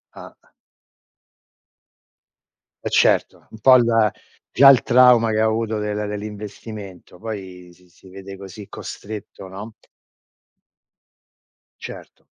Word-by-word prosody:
Ah. - - -12 2.5
Eh - - -1
certo, - - +1
un 110 - -13
po' 130 +2 +7
il 115 -3 +2 0.4
già 135 +1 +7
il 130 -4 +6
trauma, 125 -2 +5
che 110 - 0
ha 110 - +3
avuto 110 0 -1
del 105 0 -3
dell'investimento, 105 -3 -9
poi 95 -4 -8
si 90 +1 -23
si 95 +2 -20
vede 95 +1 -10
così 100 +1 -11
costretto, 105 -2 -9
no? 100 +4 -9 2.1
Certo. - - -11
105 Hz, 105 wpm, -21 LUFS, 95-115 Hz, 2.5 s, po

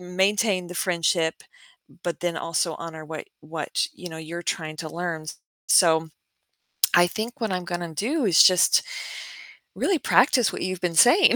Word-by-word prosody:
maintain 190 +1 0
the 180 - -8
friendship, 170 -2 0 0.7
but 170 -3 -3
then 175 -1 -2
also 165 0 -1
honor 160 -2 -8
what 155 0 -8
what, 155 0 -3
you 180 - -9
know, 160 -1 -9
you're 170 +2 -7
trying 160 -2 -3
to 160 - -5
learn? 170 -2 -4 0.4
So, 160 -2 +4 0.9
I 175 0 +6
think 225 +8 -5
what 220 -4 -1
I'm 180 -1 -3
gonna 175 -1 -4
do 260 - -1
is 175 -5 +7
just 185 -1 +5 0.9
really 385 - +1
practice 250 -4 +3
what - - -5
you've 185 0 -4
been 175 -2 -1
saying. 285 - +6
175 Hz, 160 wpm, -24 LUFS, 165-190 Hz, 0.9 s, is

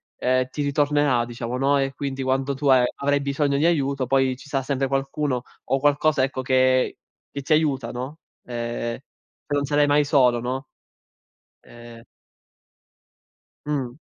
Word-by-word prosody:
ehm, 130 0 +1
ti 145 +2 -3
ritornerà 145 -3 +2
diciamo, 120 +1 -5
no, 140 +1 +3
e 135 0 -1
quindi 135 -1 -4
quando 135 +1 0
tu 145 - -6
a 130 -2 +6
avrai 145 0 0
bisogno 140 0 0
di 155 - +2
aiuto 140 -5 0
poi 135 -1 +2
ci 140 - -14
sarà 135 -2 -1
sempre 135 0 -1
qualcuno 135 -1 -1 0.2
o 135 - 0
qualcosa 145 0 +2
ecco 130 -1 -2
che 130 0 +2 0.3
che 140 - -5
ti 155 - +2
aiuta, 140 -6 +1
no, 130 +5 -6 0.3
ehm, 120 -1 -4 0.5
non 145 -1 0
sarai 145 +1 +3
mai 145 +1 +3
solo, 125 -4 +3
no? 130 +3 -4 1.0
Ehm 120 -1 -13 1.6
Mh. 135 -3 -3
135 Hz, 150 wpm, -23 LUFS, 130-145 Hz, 1.6 s, a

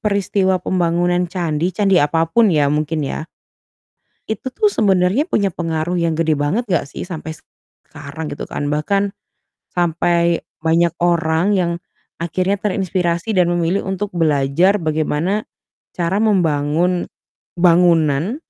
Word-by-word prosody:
peristiwa 200 -2 +1
pembangunan 175 0 0
candi, 170 -2 -1
candi 195 -1 +3
apapun 165 +9 +2
ya 150 -2 +3
mungkin 155 0 -1
ya 155 - -4 1.0
itu 220 +4 -4
tuh 425 - +2
sebenarnya 200 - +2
punya 210 - +1
pengaruh 165 0 -2
yang 170 -1 +1
gede 160 -2 +2
banget 150 +12 -1
nggak 180 -4 0
sih - - -7
sampai 160 -3 -6 0.6
sekarang 150 +1 -8
gitu 145 - -6
kan, 145 - -4
bahkan 195 +7 0 0.6
sampai 170 0 +1 0.2
banyak 165 +1 +2
orang 170 +3 +2
yang 175 -2 +1 0.5
akhirnya 185 +4 -1
terinspirasi 185 -1 -1
dan 180 -4 +3
memilih 175 +2 0
untuk 195 +1 -3
belajar 165 +3 +2
bagaimana 160 +5 -1 0.5
cara 180 +3 0
membangun 175 -3 +1 0.5
bangunan 170 - +3
175 Hz, 120 wpm, -18 LUFS, 160-190 Hz, 1.0 s, candi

